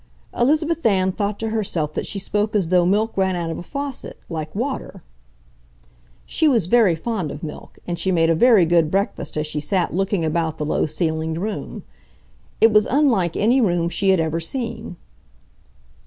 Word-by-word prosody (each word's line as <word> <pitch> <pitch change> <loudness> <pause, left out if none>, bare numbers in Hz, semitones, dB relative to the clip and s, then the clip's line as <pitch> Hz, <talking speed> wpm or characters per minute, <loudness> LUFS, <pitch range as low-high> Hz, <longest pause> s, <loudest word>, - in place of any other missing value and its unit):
Elizabeth 310 +6 +1
Ann 190 -3 +2
thought 205 +1 -2
to 225 - -3
herself 175 -9 -2
that - - -3
she - - -4
spoke 210 +2 -1
as 190 -6 +1
though 180 -1 +3
milk 215 +4 +1
ran 190 -1 +1
out 170 -2 -3
of - - -5
a - - -6
faucet, 280 +6 -6
like 155 -1 -5
water. 230 - -4 1.2
She 315 - +1
was 235 - +3
very 205 -3 +4
fond 190 -2 -3
of 150 - -8
milk, 150 - -8
and 175 -1 -4
she 190 - 0
made 165 -2 +3
a - - +4
very 210 +1 +5
good 165 -2 +3
breakfast 195 -3 -2
as 150 - -1
she 150 0 -3
sat 175 +4 -1
looking 195 -1 0
about 160 0 -1
the 150 - -3
low 155 - 0
ceilinged 160 +1 -2
room. 210 +2 -5 0.8
It 225 - +6
was 210 0 +4
unlike 235 - +2
any 240 +5 +3
room 175 -5 +1
she 195 +2 0
had 190 -2 +4
ever 160 0 0
seen. 230 +2 -5
190 Hz, 185 wpm, -21 LUFS, 165-225 Hz, 1.2 s, It